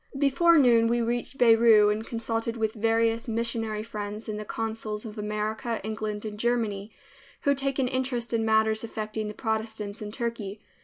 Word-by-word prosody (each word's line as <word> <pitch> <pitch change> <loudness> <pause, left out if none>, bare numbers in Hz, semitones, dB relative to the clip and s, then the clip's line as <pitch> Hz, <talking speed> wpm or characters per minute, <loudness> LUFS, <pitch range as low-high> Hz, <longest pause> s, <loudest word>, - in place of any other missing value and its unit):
Before 295 +5 +4
noon 235 -5 +5
we 240 +1 +1
reached 240 +3 -2
Beirut 225 -3 +6
and 215 +1 -4
consulted 230 0 -3
with 220 -1 0
various 225 +1 +1
missionary 225 -2 -2
friends 210 -1 -6
and 210 -1 -3
the 215 - -6
consuls 220 0 -4
of 215 -1 -7
America, 215 +3 -2
England 215 0 -4
and 210 -1 -6
Germany, 220 -3 -1 0.5
who 280 - +3
take 275 -1 -1
an 265 -2 +2
interest 250 -2 -2
in 225 -1 +1
matters 220 0 +2
affecting 215 -1 -4
the 210 - -6
Protestants 220 -1 -3
in 210 -1 -5
Turkey. 225 -4 -4
225 Hz, 165 wpm, -27 LUFS, 215-235 Hz, 0.5 s, Beirut